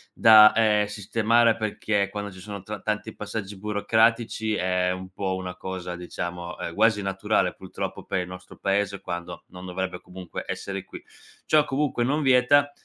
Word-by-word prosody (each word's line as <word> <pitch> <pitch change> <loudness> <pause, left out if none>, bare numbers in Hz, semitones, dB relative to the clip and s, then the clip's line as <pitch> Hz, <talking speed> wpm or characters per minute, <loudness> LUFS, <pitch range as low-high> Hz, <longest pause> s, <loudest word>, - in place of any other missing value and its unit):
da, 110 -1 +8
ehm, 105 -2 +3
sistemare 115 +3 +2
perché 105 -2 -1
quando 105 -1 -5
ci 95 - -12
sono 100 +1 -7
tra 105 +3 -6
tanti 110 +1 -3
passaggi 105 -1 -5
burocratici, 110 +2 +1
è 90 -1 +1
un 95 0 -6
po' 95 0 -3
una 90 -1 -5
cosa, 90 -1 -5
diciamo, 90 0 -6
ehm, 85 - -4
quasi 110 +1 +3
naturale 95 -1 0
purtroppo - - -6
per - - -2
il 90 - -3
nostro 90 0 -11
paese 100 0 -1
quando 85 0 -6
non 90 0 -11
dovrebbe 90 0 -4
comunque 90 -1 -8
essere 95 -1 -4
qui. - - -11 0.4
Ciò 155 -1 +4
comunque 140 -3 0
non 145 +5 +1
vieta 135 +2 +4
100 Hz, 165 wpm, -25 LUFS, 95-110 Hz, 0.4 s, da